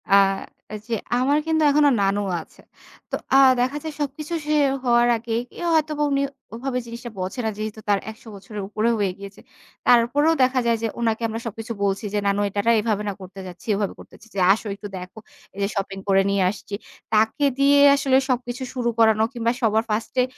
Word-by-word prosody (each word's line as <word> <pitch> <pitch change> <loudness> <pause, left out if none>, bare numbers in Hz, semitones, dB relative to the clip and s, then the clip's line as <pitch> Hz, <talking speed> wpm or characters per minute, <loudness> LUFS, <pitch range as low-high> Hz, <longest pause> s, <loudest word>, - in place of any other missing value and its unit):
আ - - +8 0.7
যে 230 - 0 0.2
আমার 280 +3 +2
কিন্তু 315 -1 +2
এখনো 295 0 +5
নানু 200 +1 +1 0.2
আছে। - - -18 0.5
তো - - 0 0.2
আ - - +8 0.2
দেখা 265 +4 0
যায় 315 -1 -5
সবকিছু 295 +3 -4
শেষ 300 -2 +3
হওয়ার 240 -1 +4
আগে 225 0 -5 0.4
হয়তোবা 305 -1 +1
উনি 275 0 +2 0.3
ওভাবে 250 +1 -2
জিনিসটা 235 +1 -8
বোঝে 185 +7 -4
না। - - +1
যেহেতু 215 0 -5
তার 200 -1 +3
১০০ 220 +1 -17
বছরের 200 +1 -8
উপরে 215 +2 0
হয়ে 200 -3 0
গিয়েছে। 200 0 -11 0.5
তারপরেও 250 +7 +4
দেখা 255 0 +2
যায় 230 -1 +2
যে - - +2
ওনাকে 225 -1 0
আমরা 225 +1 -4
সবকিছু 225 +1 -5
বলছি, 200 +1 0
যে 205 - +1
"নানু 200 +1 +1
এটা 205 +1 -1
না - - +6
এভাবে 210 -2 -1
না - - -3
করতে 190 +1 -10
যাচ্ছি, 180 +5 -12
এভাবে 200 -1 -2
করতে - - -14
যাচ্ছি। 225 - -18
যে - - -1
আসো 220 0 -5
একটু 205 - -8
দেখো। 180 +4 -9 0.4
এই - - -9
যে - - +2
শপিং 195 0 -3
করে 195 0 +4
নিয়ে 200 -1 +2
আসছি।" 200 0 -6 0.4
তাকে 220 +7 +2
দিয়ে 280 +1 +5 0.2
আসলে 270 -1 +2
সব 250 -1 +2
কিছু 250 +2 -5
শুরু 245 -2 -1
করানো, 220 -1 +5
কিংবা 235 -1 0
সবার 220 0 +2
ফার্স্ট 215 +2 -2
এ - - +4
230 Hz, 200 wpm, -23 LUFS, 205-260 Hz, 0.7 s, আ